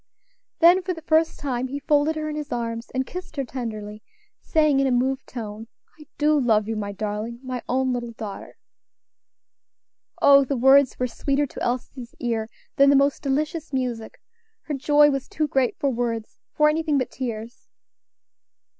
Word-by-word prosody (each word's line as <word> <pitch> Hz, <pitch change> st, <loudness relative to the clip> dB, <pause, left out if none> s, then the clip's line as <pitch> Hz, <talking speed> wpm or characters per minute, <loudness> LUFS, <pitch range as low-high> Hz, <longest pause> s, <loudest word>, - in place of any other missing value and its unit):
Then 350 Hz, +3 st, +7 dB
for 365 Hz, 0 st, -3 dB
the 325 Hz, -, -11 dB
first 320 Hz, +1 st, +2 dB
time 260 Hz, -3 st, -2 dB
he 275 Hz, +2 st, -5 dB
folded 290 Hz, +2 st, +1 dB
her 310 Hz, 0 st, -3 dB
in 305 Hz, -, -4 dB
his 300 Hz, -1 st, -5 dB
arms 230 Hz, -1 st, -3 dB
and 260 Hz, 0 st, -2 dB
kissed 360 Hz, -1 st, -8 dB
her 275 Hz, -, -1 dB
tenderly, 215 Hz, -4 st, -6 dB, 0.4 s
saying, 305 Hz, -3 st, +2 dB
in 275 Hz, -, +2 dB
a -, -, +1 dB
moved 260 Hz, +2 st, 0 dB
tone, 220 Hz, -2 st, -7 dB, 0.3 s
"I 305 Hz, -, -14 dB
do 300 Hz, 0 st, +3 dB
love 220 Hz, -5 st, +2 dB
you, 225 Hz, -, -2 dB
my 205 Hz, -1 st, -3 dB
darling, 215 Hz, +3 st, -4 dB
my 255 Hz, -2 st, -4 dB
own 260 Hz, 0 st, +1 dB
little 240 Hz, -1 st, -4 dB
daughter." 210 Hz, -3 st, -8 dB, 1.6 s
Oh! 280 Hz, 0 st, +7 dB
the 275 Hz, 0 st, -2 dB
words 270 Hz, +1 st, +5 dB
were 250 Hz, -, 0 dB
sweeter 275 Hz, +3 st, -1 dB
to -, -, -10 dB
Elsie's 245 Hz, 0 st, -4 dB
ear 230 Hz, -2 st, -2 dB, 0.3 s
than 275 Hz, -1 st, +6 dB
the 280 Hz, -, +5 dB
most 280 Hz, +1 st, +2 dB
delicious 305 Hz, +3 st, -2 dB
music! 245 Hz, -4 st, -3 dB, 0.4 s
her 300 Hz, -, -5 dB
joy 295 Hz, +2 st, +4 dB
was 275 Hz, -1 st, -3 dB
too 310 Hz, -, -1 dB
great 265 Hz, -3 st, 0 dB
for 280 Hz, -, 0 dB
words, 230 Hz, -2 st, -3 dB
for 300 Hz, -, +3 dB
anything 305 Hz, -1 st, +1 dB
but 255 Hz, -3 st, -1 dB
tears. 235 Hz, -2 st, -6 dB
265 Hz, 170 wpm, -24 LUFS, 235-295 Hz, 1.6 s, Then